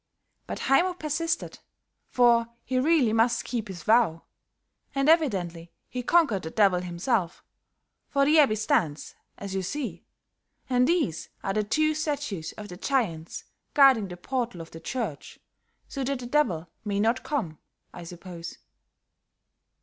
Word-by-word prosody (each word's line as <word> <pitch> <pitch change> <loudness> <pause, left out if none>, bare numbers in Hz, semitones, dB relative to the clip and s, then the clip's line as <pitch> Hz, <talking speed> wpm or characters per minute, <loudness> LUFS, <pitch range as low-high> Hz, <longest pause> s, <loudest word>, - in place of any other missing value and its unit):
But - - -5
Haymo 355 +7 +3
persisted, 315 0 -2 0.5
for 235 -2 +4 0.2
he 255 0 0
really 275 -5 +3
must 230 +1 +2
keep 235 -4 -3
his 185 -3 -8
vow; 215 -8 +3 0.7
and 275 +1 +1
evidently 185 - +1 0.2
he 250 - -4
conquered 245 - +3
the 160 - -6
Devil 195 -1 +3
himself, 180 +1 -2 0.7
for 275 0 +2
the 310 +2 +5
abbey 270 -8 +5
stands, 215 - 0 0.2
as 200 -1 -6
you 190 - -1
see, 270 +8 -4 0.6
and 250 0 +3
these 315 - 0
are 195 - -1
the 215 +1 +1
two 310 +9 +1
statues 290 - -3
of 210 - -9
the 180 - -8
giants 185 - -2 0.3
guarding 265 -7 +6
the 180 -1 -8
portal 240 -1 -3
of 165 0 -9
the 165 - -9
church, 195 - -5 0.5
so 275 - -4
that 275 +1 -1
the 245 - -8
Devil 240 - +1 0.2
may 200 -2 -1
not 230 +4 +2
come, 210 - -3 0.3
I 175 - -9
suppose." 170 0 -9
230 Hz, 145 wpm, -27 LUFS, 180-275 Hz, 0.7 s, guarding